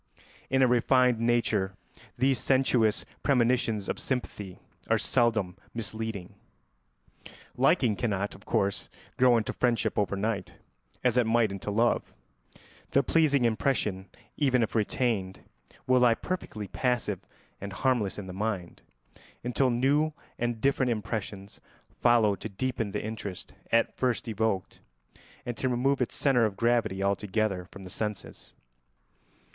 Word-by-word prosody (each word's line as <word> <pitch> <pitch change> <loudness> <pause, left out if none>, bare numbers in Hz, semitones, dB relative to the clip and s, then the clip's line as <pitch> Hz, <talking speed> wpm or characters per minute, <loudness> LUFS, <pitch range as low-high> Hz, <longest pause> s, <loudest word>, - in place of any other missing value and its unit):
In 135 0 +3
a - - +6
refined 125 0 +3
nature 115 -5 +1 0.4
these 130 +1 +2
sensuous 125 -5 +2 0.2
premonitions 120 -5 +2
of - - -2
sympathy 105 -7 -4 0.3
are - - +4
seldom 110 -7 +1 0.2
misleading. 110 -4 -4 1.2
Liking 110 -4 +3
cannot, 100 -3 -1
of 100 - -15
course, 100 0 -1 0.3
grow 125 -2 +5
into 110 - -1
friendship 120 -4 +1
over 100 -1 0
night 100 -1 -2 0.5
as - - +2
it 120 -2 +3
might 115 -2 +3
into 100 +1 -5
love; 115 +4 +1 0.7
the 140 - +3
pleasing 145 -3 +3
impression, 110 -5 0 0.3
even 130 -5 +3
if 110 - -3
retained, 105 -4 -1 0.4
will 130 0 +4
lie 120 -2 +5
perfectly 110 - -5
passive 115 -2 -1 0.4
and 100 0 -5
harmless 115 -2 0
in 105 - -6
the 95 - -7
mind, 100 -3 -3 0.6
until 125 +2 +1
new 140 +6 +2 0.3
and 120 -1 -1
different 135 -2 +2
impressions 105 -2 -4 0.4
follow 115 -4 +5
to 100 +3 -6
deepen 115 +1 -2
the - - -3
interest 105 -4 -6 0.2
at 115 0 +2
first 125 -2 -1
evoked 110 -4 -1 0.7
and 120 - -3
to 130 - 0
remove 130 +2 +1
its 125 - -1
centre 125 -5 +3
of 100 -2 -8
gravity 115 -5 +1
altogether 100 -1 0
from 100 +1 -12
the 90 - -10
senses. 105 0 -5
115 Hz, 130 wpm, -28 LUFS, 100-125 Hz, 1.2 s, a